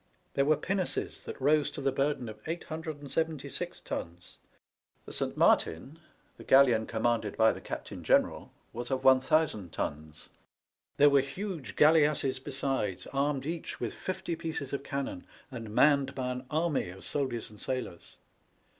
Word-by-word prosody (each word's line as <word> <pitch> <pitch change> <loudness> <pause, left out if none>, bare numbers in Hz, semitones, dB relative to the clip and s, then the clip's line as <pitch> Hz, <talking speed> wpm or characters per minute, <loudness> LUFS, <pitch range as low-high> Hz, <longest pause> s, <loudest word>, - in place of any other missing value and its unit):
There 140 - +2
were 155 +1 +4
pinnaces 190 -1 -2
that - - -7
rose 145 +2 +3
to - - -7
the 135 -1 +1
burden 135 -2 0
of 110 -1 -8
876 160 -2 -3
tons. 85 +1 -7 0.7
The - - -9
Saint - - -2
Martin, 135 - +2 0.4
the - - -11
galleon 125 -5 +5
commanded 115 -2 0
by 110 0 +6
the - - -9
Captain - - -6
General, - - +2 0.2
was 120 +1 -5
of 130 -1 -1
1000 130 - +3
tons. 75 +1 -5 0.7
There 145 0 +7
were 140 -1 +6
huge 160 +2 -5
galleasses 150 -4 +4
besides, 135 -8 -2
armed 140 0 0
each 165 +1 -4
with - - -3
fifty 180 -2 -4
pieces 155 -5 -4
of 140 - -1
cannon, 140 -10 -4 0.3
and 115 -4 -6
manned 140 +4 +3
by 125 -1 -2
an 125 0 -6
army 155 - 0
of 95 +1 -10
soldiers 130 -6 -2
and 105 - -11
sailors. 130 -10 -5
135 Hz, 145 wpm, -30 LUFS, 120-150 Hz, 0.7 s, There